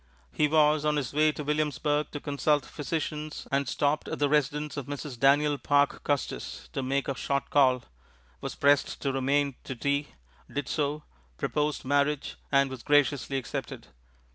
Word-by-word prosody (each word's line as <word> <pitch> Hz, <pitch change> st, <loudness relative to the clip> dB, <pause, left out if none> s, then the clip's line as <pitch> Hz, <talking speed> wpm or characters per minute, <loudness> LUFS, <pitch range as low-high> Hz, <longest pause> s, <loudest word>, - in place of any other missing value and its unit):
He 150 Hz, -, +2 dB
was 150 Hz, 0 st, +4 dB
on 150 Hz, 0 st, +2 dB
his 140 Hz, -4 st, -2 dB
way 155 Hz, +1 st, +4 dB
to 150 Hz, -, -5 dB
Williamsburg 150 Hz, 0 st, 0 dB
to 145 Hz, -, -6 dB
consult 145 Hz, 0 st, +1 dB
physicians 150 Hz, 0 st, -4 dB
and 140 Hz, -1 st, +1 dB
stopped 145 Hz, +4 st, 0 dB
at -, -, -3 dB
the 145 Hz, -1 st, +2 dB
residence 150 Hz, 0 st, 0 dB
of 140 Hz, -4 st, -5 dB
Mrs. 145 Hz, -3 st, -6 dB
Daniel 145 Hz, +2 st, +4 dB
Parke 145 Hz, 0 st, +2 dB
Custis 145 Hz, -2 st, -3 dB
to -, -, -2 dB
make 135 Hz, +1 st, -1 dB
a 140 Hz, -, 0 dB
short 140 Hz, +1 st, -2 dB
call 130 Hz, -4 st, +4 dB, 0.6 s
was -, -, -5 dB
pressed 145 Hz, 0 st, +3 dB
to 135 Hz, -2 st, 0 dB
remain 140 Hz, +1 st, +1 dB
to 135 Hz, -, -5 dB
tea, 140 Hz, +3 st, 0 dB, 0.4 s
did 145 Hz, 0 st, -3 dB
so, 150 Hz, 0 st, -1 dB, 0.3 s
proposed 150 Hz, -1 st, -1 dB
marriage, 145 Hz, +1 st, +1 dB, 0.2 s
and 140 Hz, -1 st, +3 dB
was 130 Hz, -2 st, -7 dB
graciously 145 Hz, -1 st, +2 dB
accepted. 130 Hz, -, -5 dB
145 Hz, 165 wpm, -28 LUFS, 140-150 Hz, 0.6 s, was